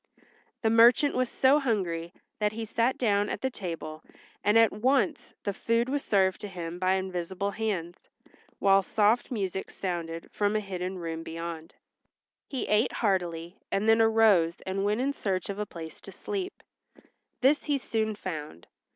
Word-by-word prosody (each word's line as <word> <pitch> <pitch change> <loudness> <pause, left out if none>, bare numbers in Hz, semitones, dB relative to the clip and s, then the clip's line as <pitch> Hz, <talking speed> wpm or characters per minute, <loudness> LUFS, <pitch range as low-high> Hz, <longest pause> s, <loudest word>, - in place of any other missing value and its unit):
The 220 - +3
merchant 240 +5 +6
was 255 -1 0
so 270 +3 +4
hungry 180 - -1 0.3
that 210 0 +1
he 225 +1 -4
sat 230 +4 +1
down 205 -3 +2
at - - -4
the 265 - -1
table, 165 -7 -6 0.4
and 210 +2 +4
at 225 -1 +6
once 265 +6 0
the 200 - -1
food 230 +4 0
was 280 +1 -1
served 190 -2 +2
to 210 - -4
him 175 -2 -6
by 185 0 +2
invisible 190 +1 -2
hands, 190 -5 -4 0.5
while 195 0 +5
soft 215 +4 +2
music 195 -5 -3
sounded 170 -3 -4
from 205 0 0
a - - +3
hidden 185 -2 -4
room 165 -2 -4
beyond. 165 0 -7 0.7
He 265 - -3
ate 210 +3 +2
heartily 175 -4 -1
and 200 +2 0
then 225 0 +6
arose 220 -7 +4
and 190 +1 -2
went 210 +4 +1
in 275 +2 0
search 190 -8 -2
of 200 - -7
a 210 - -2
place 165 -3 -9
to - - -10
sleep. 390 -2 -5 0.8
This 275 +4 +3
he 290 -2 +1
soon 220 -4 -1
found. 155 - -6
200 Hz, 165 wpm, -28 LUFS, 175-225 Hz, 0.8 s, merchant